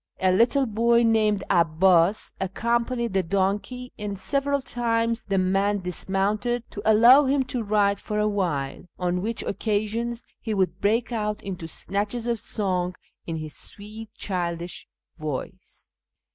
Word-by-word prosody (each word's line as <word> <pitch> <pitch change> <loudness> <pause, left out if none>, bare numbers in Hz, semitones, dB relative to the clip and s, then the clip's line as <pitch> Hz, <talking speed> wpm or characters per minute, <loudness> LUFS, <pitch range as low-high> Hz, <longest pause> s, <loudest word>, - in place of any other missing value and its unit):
A 185 0 +3
little 240 +8 +3
boy 235 +1 +3
named 215 -3 +3
'Abbas 170 +3 +3
accom 235 +5 0
panied 235 -4 -2
the 190 - +3
donkey, 200 +7 -1
and 205 -1 -4
several 280 +7 0
times 230 -2 0
the 195 - -1
man 195 +2 +1
dismounted 200 +6 -1
to 205 - -6
allow 245 +7 +7
him 270 0 +2
to 250 -1 -4
ride 205 -2 +2
for 210 - -4
a 210 0 +2
while, 170 -9 -2
on 180 0 -1
which 225 +3 -2
occasions 225 +3 -2
he 220 -2 -3
would 185 -2 0
break 225 +4 +1
out 210 -2 -1
into 180 -4 -5
snatches 205 +7 -2
of 235 -2 0
song 185 -4 -1 0.3
in 165 - -2
his 155 -2 -6
sweet, 215 +2 -8
childish 175 -2 -4 0.3
voice. 155 +5 -6
205 Hz, 145 wpm, -25 LUFS, 185-230 Hz, 0.3 s, allow